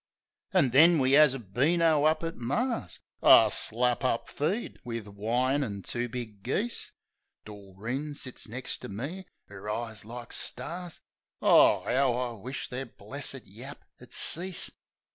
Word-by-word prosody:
An' 130 - +3
then 165 +6 +7
we 135 -1 +3
'as 150 -3 +6
a - - -3
beano 150 - +2
up 155 +1 +2
at 165 0 -3
Mar's 135 - -2 0.2
— - - -45
A - - +7
slap 125 +2 0
up 120 -2 0
feed, 175 +11 -2
wiv 115 -3 -5
wine 120 +7 0
an' 100 -6 -5
two 120 0 -2
big 110 -4 -7
geese. 205 - -2 0.5
Doreen 105 +8 -6
sits 130 -4 -3
next 125 +4 -4
ter - - -8
me, 140 - -6 0.3
'er 100 +1 -8
eyes 110 0 -3
like 120 +2 -8
stars. 175 -1 -2 0.4
O, - - +5
'ow 130 -1 +2
I 125 -1 -2
wished 120 +4 -7
their 130 +1 -4
blessed - - -6
yap - - -11
would - - -15
cease 180 +3 0
125 Hz, 150 wpm, -28 LUFS, 115-150 Hz, 0.5 s, then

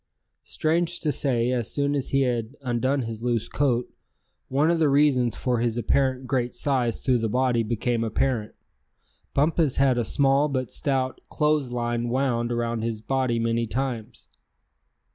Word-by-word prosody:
Strange 170 +2 0
to 155 - 0
say, 125 -3 +1
as 120 -3 -2
soon 140 0 0
as 140 -2 -2
he 135 - +2
had 120 -1 -1
undone 130 +2 0
his 115 0 -6
loose 120 -3 0
coat, 125 -4 0 0.6
one 145 +5 +2
of 170 - +1
the 155 -2 +3
reasons 135 -4 +3
for 125 -2 -1
his 120 -1 0
apparent 130 +2 +1
great 125 -2 -1
size 130 -5 0
through 125 -2 +1
the 115 -1 -1
body 125 0 +2
became 115 +1 -1
apparent. 115 0 -1 0.8
Bumpus 150 0 +2
had 135 -2 +3
a - - +1
small 140 +4 +2
but 130 -4 -2
stout 130 -2 -1
clothes 150 -4 +1
line 120 0 -2
wound 120 -2 0
around 120 -1 -1
his 115 -1 -2
body 130 +1 0
many 115 0 0
times. 125 -2 -4
125 Hz, 160 wpm, -25 LUFS, 120-140 Hz, 0.8 s, the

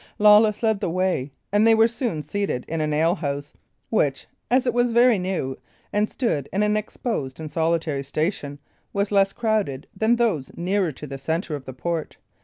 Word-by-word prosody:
Lawless 210 +1 +5
led 220 -2 +2
the - - -1
way, 180 -6 0 0.2
and 205 +2 +4
they 225 - +6
were 225 +1 +5
soon 230 - -3
seated 195 -5 -2
in 165 0 -2
an 155 0 0
alehouse, 150 -2 0 0.4
which, 145 -11 +1 0.2
as 255 +1 +3
it 245 - +1
was 245 -1 +2
very 240 -2 +5
new, 180 -8 -2 0.4
and 210 +1 +1
stood 155 - -1
in 200 +2 +1
an 210 0 +2
exposed 210 - -3
and 155 -1 -6
solitary 160 -3 0
station, 145 0 -2 0.4
was 200 +1 0
less 195 -1 +4
crowded 210 - -1
than 220 +2 +3
those 215 - 0
nearer 185 0 0
to 150 - -9
the 135 -1 -7
centre 160 +3 -2
of 140 -2 -8
the 130 - -7
port. 160 +5 -3
185 Hz, 185 wpm, -24 LUFS, 150-215 Hz, 0.4 s, they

